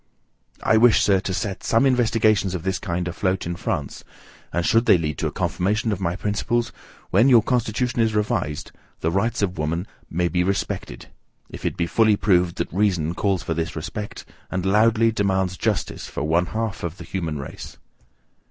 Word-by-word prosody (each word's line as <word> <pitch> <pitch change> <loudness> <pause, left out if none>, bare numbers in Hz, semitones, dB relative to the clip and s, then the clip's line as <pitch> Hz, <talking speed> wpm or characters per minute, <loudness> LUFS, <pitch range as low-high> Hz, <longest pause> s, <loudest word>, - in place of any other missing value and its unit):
I 110 - +4
wish, 120 0 +6
sir, 100 -2 +4
to 95 - -4
set 95 +1 -3
some 115 +4 +3
investigations 115 -6 +2
of 85 - -5
this 95 0 -1
kind 90 -3 -3
afloat 95 +2 -1
in 85 +1 -3
France; 80 -5 -4 0.5
and 85 0 -1
should 115 +2 +3
they - - +7
lead 75 -3 -3
to - - 0
a - - -4
confirmation 105 +4 0
of 100 -2 -3
my 85 -1 -1
principles, 105 +4 -1 0.4
when 130 - +5
your 120 -4 +6
constitution 120 0 0
is 110 -1 +2
revised, 105 -8 -1 0.3
the 80 - 0
rights 105 +5 0
of 90 -4 -2
woman 80 +4 -1 0.2
may 85 +2 0
be 90 +1 +1
respected, 90 -9 -3 0.4
if - - -9
it - - -1
be 85 - +1
fully 110 +4 +3
proved 90 -4 +2
that - - -4
reason 90 -5 +1
calls 95 0 0
for 80 - -2
this 80 0 -3
respect, 100 +6 -6 0.2
and 95 0 -2
loudly 110 +3 +4
demands 95 -3 0
JUSTICE - - -2
for - - -4
one 85 +3 +2
half 110 0 -3
of 85 +1 -4
the 90 - -9
human 85 -4 -3
race. 70 - -8
95 Hz, 185 wpm, -23 LUFS, 85-110 Hz, 0.5 s, they